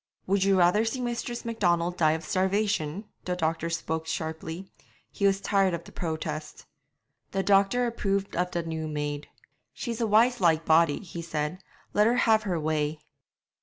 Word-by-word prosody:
'Would 195 0 +2
you 195 -1 +4
rather 180 +4 +4
see 225 +3 -2
Mistress 240 0 -3
Macdonald 175 -6 +1
die 155 -3 +3
of 160 0 -4
starvation?' 190 -2 0 0.2
The 180 - -1
doctor 165 -1 -1
spoke 160 -1 -3
sharply; 160 +3 -4 0.4
he 200 - +1
was 195 0 +2
tired 195 -3 +2
of 170 - -7
the - - -13
protest. 155 -2 -5 0.7
The 195 0 0
doctor 200 +5 +3
approved 200 -4 -1
of 180 +1 0
the 170 -1 -2
new 160 -1 -4
maid. 145 -1 -3 0.5
'She's 235 -2 -4
a 225 - +2
wise 230 +2 +4
like 165 -2 +3
body,' 160 +1 +4
he 170 -2 -7
said; 155 +1 -3 0.3
'let 210 +1 +4
her 240 - +3
have 220 -3 +4
her 175 -3 0
way.' 155 0 -1
180 Hz, 165 wpm, -27 LUFS, 160-205 Hz, 0.7 s, you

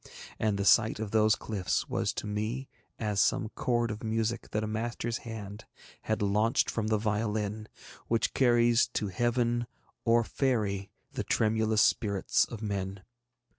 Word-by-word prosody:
And 105 -2 +1
the 100 - -1
sight 110 0 +4
of 110 -2 -4
those 110 -1 +4
cliffs 100 -5 -2
was - - 0
to - - -5
me 110 +6 -3 0.3
as 105 -3 0
some 120 -5 +1
chord 120 0 0
of 105 +2 -7
music 115 +1 -1
that 105 0 -1
a - - -2
master's 115 +1 -3
hand 105 -1 -7 0.4
had 110 -1 -1
launched 105 +5 +2
from 110 -2 -2
the 110 0 +2
violin, 105 -1 -1
and 110 0 -10 0.4
which 115 0 +1
carries 120 -2 +4
to 105 - -1
Heaven 120 +3 0 0.4
or 115 0 +4
Faery 105 -7 -1 0.2
the - - -3
tremulous 110 -1 +2
spirits 100 -4 +2
of 115 -2 -8
men. 100 -2 -3
110 Hz, 155 wpm, -30 LUFS, 105-115 Hz, 0.4 s, sight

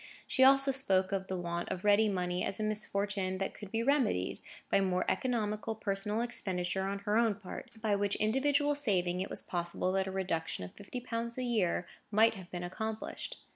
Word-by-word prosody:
She 260 - +3
also 275 +1 +6
spoke 190 -8 +1
of 190 -1 -1
the 190 - -2
want 170 -1 -3
of 180 - -4
ready 210 +1 +5
money 180 -2 -1
as 195 - -1
a - - 0
misfortune 200 -2 -1
that 195 - -2
could 205 -2 -9
be 225 +2 -1
remedied, 250 - +1 0.3
by - - +4
more 185 -1 +1
economical 220 -3 -1
personal 210 +1 -1
expenditure 190 -5 -1
on 200 +1 -2
her 210 +1 +2
own 230 -3 +3
part; 205 +5 -8
by 210 -2 +3
which 200 0 +1
individual 285 +6 +2
saving, 185 -10 +1
it 190 - -3
was - - -1
possible 175 +1 -1
that 190 0 +1
a - - -3
reduction 180 - -2
of 90 - -11
fifty 225 +5 -7
pounds 235 -1 -3
a 255 - -1
year 210 -8 +1 0.2
might 220 +2 +5
have 185 -4 -10
been 175 -1 -5
accomplished. 215 +5 -4
205 Hz, 195 wpm, -32 LUFS, 185-230 Hz, 0.3 s, also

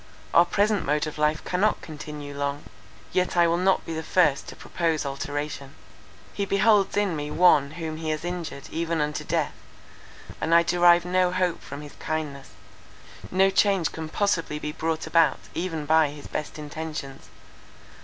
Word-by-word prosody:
our 170 - +7
present 205 0 +1
mode 150 +2 +1
of 155 0 -7
life 150 +1 +1
cannot 195 +4 +1
continue 150 -2 -8
long, 140 0 -3 0.5
yet 180 -1 0
I 170 - +6
will 170 0 +2
not 190 +1 +2
be 165 - -5
the 160 - -3
first 160 -5 +2
to - - -8
propose 165 -3 -1
alteration. 140 0 -4 0.6
He 200 - -2
beholds 200 0 +3
in 200 -5 +1
me 150 -1 -4
one 150 -5 +4
whom 160 -1 -5
he 160 0 -4
has 155 +2 -2
injured 175 -6 -5
even 165 0 -1
unto 150 0 -1
death; - - -1 0.9
and 165 +1 +3
I 170 - +6
derive 175 0 +4
no 180 0 +2
hope 180 -2 0
from 145 - -8
his 145 -1 -10
kindness; 150 -3 -4 0.8
no 190 +1 +3
change 195 -3 +2
can 160 -1 -6
possibly 165 -5 0
be 150 0 -4
brought 160 +1 -2
about 160 -3 +3 0.2
even 165 -3 -3
by 160 0 +4
his 145 0 -10
best 150 - -5
intentions. 150 - -7
160 Hz, 165 wpm, -25 LUFS, 150-180 Hz, 0.9 s, our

